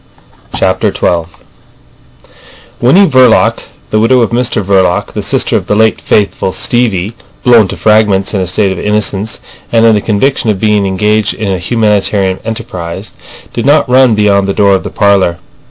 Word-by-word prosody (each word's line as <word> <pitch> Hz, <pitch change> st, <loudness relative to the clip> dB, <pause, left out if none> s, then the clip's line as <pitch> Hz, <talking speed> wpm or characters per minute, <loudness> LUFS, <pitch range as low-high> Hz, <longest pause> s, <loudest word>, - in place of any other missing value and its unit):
CHAPTER -, -, 0 dB
XII 85 Hz, -1 st, -1 dB, 1.5 s
Winnie 145 Hz, +12 st, +4 dB
Verloc, 130 Hz, -6 st, +2 dB, 0.3 s
the 110 Hz, -, +1 dB
widow 120 Hz, +3 st, +3 dB
of 115 Hz, -, 0 dB
Mr 120 Hz, -3 st, -1 dB
Verloc, 95 Hz, -2 st, 0 dB
the -, -, -4 dB
sister -, -, -1 dB
of -, -, -2 dB
the 105 Hz, -, 0 dB
late 110 Hz, +1 st, +1 dB
faithful 100 Hz, -2 st, -1 dB
Stevie 110 Hz, -4 st, -1 dB, 0.3 s
(blown 115 Hz, -5 st, +4 dB
to -, -, -7 dB
fragments 105 Hz, -3 st, +1 dB
in 100 Hz, -, -1 dB
a 90 Hz, -, -2 dB
state 95 Hz, +2 st, 0 dB
of 95 Hz, -, -5 dB
innocence 105 Hz, 0 st, -2 dB, 0.3 s
and 115 Hz, -1 st, +3 dB
in 115 Hz, -, +5 dB
the 105 Hz, -, 0 dB
conviction 115 Hz, +3 st, -1 dB
of 100 Hz, -3 st, -1 dB
being 105 Hz, -2 st, +1 dB
engaged 105 Hz, +2 st, 0 dB
in 105 Hz, -3 st, -3 dB
a 95 Hz, -, -2 dB
humanitarian 100 Hz, -2 st, 0 dB
enterprise), 95 Hz, -4 st, -7 dB, 0.4 s
did 120 Hz, +2 st, -3 dB
not 145 Hz, +1 st, +3 dB
run 125 Hz, -2 st, +3 dB
beyond 100 Hz, -2 st, +1 dB
the 100 Hz, -, -2 dB
door 100 Hz, -1 st, +3 dB
of 95 Hz, -, +1 dB
the -, -, -5 dB
parlour. 100 Hz, -4 st, +1 dB
105 Hz, 170 wpm, -10 LUFS, 95-115 Hz, 1.5 s, in